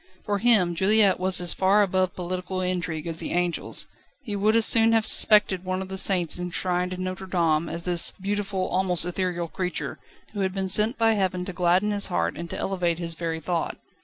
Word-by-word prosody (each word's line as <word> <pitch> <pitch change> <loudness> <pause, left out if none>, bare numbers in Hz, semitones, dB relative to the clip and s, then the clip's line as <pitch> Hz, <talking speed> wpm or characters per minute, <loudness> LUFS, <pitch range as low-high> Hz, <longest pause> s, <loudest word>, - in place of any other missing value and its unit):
For 205 -1 -1
him 205 -7 +3
Juliette 200 +2 +3
was 185 0 +2
as 175 -1 +1
far 195 +2 +3
above 185 -1 -1
political 185 +1 -4
intrigue 180 -4 -3
as 165 -1 -5
the - - -4
angels. 175 -1 0 0.4
He 210 -5 -5
would 210 +2 +1
as 230 -1 +4
soon 225 0 +4
have 225 -1 +2
suspected 210 -5 +5
one 185 0 -3
of 190 0 -6
the 190 - -5
saints 180 -4 +2
enshrined 180 0 -2
in 185 0 -5
Notre 185 +1 -5
Dame 165 -3 0
as 170 0 -6
this 175 -1 +1
beautiful, 195 -1 -2
almost 180 -2 +2
ethereal 180 -1 -3
creature, 180 +2 -5 0.3
who 205 - -5
had 190 -1 -1
been 190 -1 -2
sent 215 +6 +2
by 225 -1 +3
Heaven 185 -3 -1
to 190 - -6
gladden 180 +3 +1
his 205 -1 0
heart 85 0 -1
and 170 0 -7
to - - -5
elevate 180 -3 -1
his 170 -1 -4
very 165 -1 -4
thought. 165 0 -3
185 Hz, 205 wpm, -25 LUFS, 175-195 Hz, 0.4 s, suspected